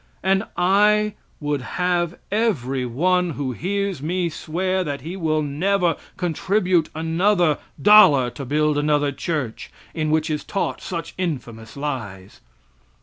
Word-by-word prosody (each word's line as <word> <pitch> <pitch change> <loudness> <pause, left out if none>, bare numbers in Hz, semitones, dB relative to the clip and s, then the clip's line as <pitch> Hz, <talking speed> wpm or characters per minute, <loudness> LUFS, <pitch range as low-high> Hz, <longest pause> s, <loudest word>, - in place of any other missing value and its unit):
And 195 +2 +2
I 210 +4 +3 0.3
would 145 -2 -2
have 175 +4 -1
every 135 - 0
one 180 +8 +1
who 140 -3 -2
hears 195 - -2
me 175 +3 -1
swear 185 +4 -2
that 145 -5 -4
he 165 +6 -6
will 155 -4 0
never 175 +4 +1 0.2
contribute 180 0 +1
another 165 0 +2 0.2
dollar 145 -9 +7
to 140 - -7
build 150 +2 +1
another 145 -1 +1
church, 140 -5 -4 0.2
in 155 -2 -1
which 155 +1 +1
is 150 - -2
taught 195 - -3
such 170 -2 -5
infamous 120 -10 -4
lies. 105 -10 -5
160 Hz, 130 wpm, -22 LUFS, 145-185 Hz, 0.3 s, dollar